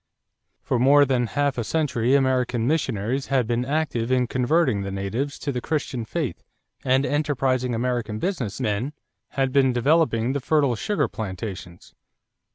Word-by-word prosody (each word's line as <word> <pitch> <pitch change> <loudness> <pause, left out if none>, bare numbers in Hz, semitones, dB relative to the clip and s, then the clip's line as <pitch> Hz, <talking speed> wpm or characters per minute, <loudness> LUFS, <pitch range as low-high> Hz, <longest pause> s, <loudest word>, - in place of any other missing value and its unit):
For 125 - 0
more 140 +3 +6
than 125 -3 +1
half 140 0 0
a - - -1
century 130 -2 +1
American 130 -3 +1
missionaries 130 -3 -1
had 135 -3 +1
been 120 +2 0
active 130 -4 -1
in 125 -1 +3
converting 130 -2 +1
the 100 - -4
natives 105 +9 -3
to 145 - -3
the 125 -2 -3
Christian 135 -6 -2
faith - - -3 0.4
and 130 +1 +2
enterprising 135 -5 0
American 120 -2 -2
business 135 - -3
men 120 +4 -1 0.4
had 135 -1 +1
been 130 -1 +3
developing 130 -2 +2
the 140 - -1
fertile 140 -2 +2
sugar 150 - 0
plantations. 95 -4 -7
130 Hz, 150 wpm, -24 LUFS, 115-140 Hz, 0.4 s, more